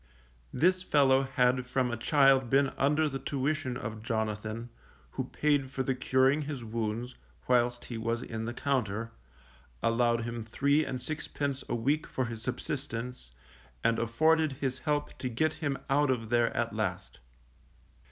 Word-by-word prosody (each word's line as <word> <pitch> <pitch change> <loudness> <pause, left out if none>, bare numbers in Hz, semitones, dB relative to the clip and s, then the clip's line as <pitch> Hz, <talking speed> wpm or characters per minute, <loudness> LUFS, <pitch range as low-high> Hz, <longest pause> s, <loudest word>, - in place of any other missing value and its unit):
This 185 +3 +3
fellow 135 -6 +4
had 125 -1 +1
from 125 -1 0
a - - -1
child 135 0 +4
been 135 +1 +4
under 150 +4 +2
the 135 -2 -4
tuition 135 0 -1
of 110 -3 -6
Jonathan, 110 0 -3 0.4
who - - -3
paid 145 -3 +1
for 135 0 -2
the 130 - 0
curing 130 +3 +3
his 140 -4 -5
wounds, 115 +2 -3 0.3
whilst 120 -1 +2
he 115 -2 -5
was 115 +1 -1
in 110 -1 -4
the 120 - -3
Compter, 115 -5 -1 0.7
allowed 115 0 +2
him 120 0 -4
three 140 +7 +2
and 130 - -4
sixpence 140 0 -3
a - - 0
week 140 +7 0
for 130 - -2
his 115 -1 -6
subsistence, 125 - -4 0.5
and 115 0 +2
afforded 155 +6 +3
his 130 -1 -3
help 150 -1 -1
to 130 - -2
get 155 +7 +1
him 145 -3 0
out 145 +1 +3
of 115 -4 -1
there 120 0 +3
at 115 0 0
last. 95 -4 -3
125 Hz, 155 wpm, -30 LUFS, 115-140 Hz, 0.7 s, fellow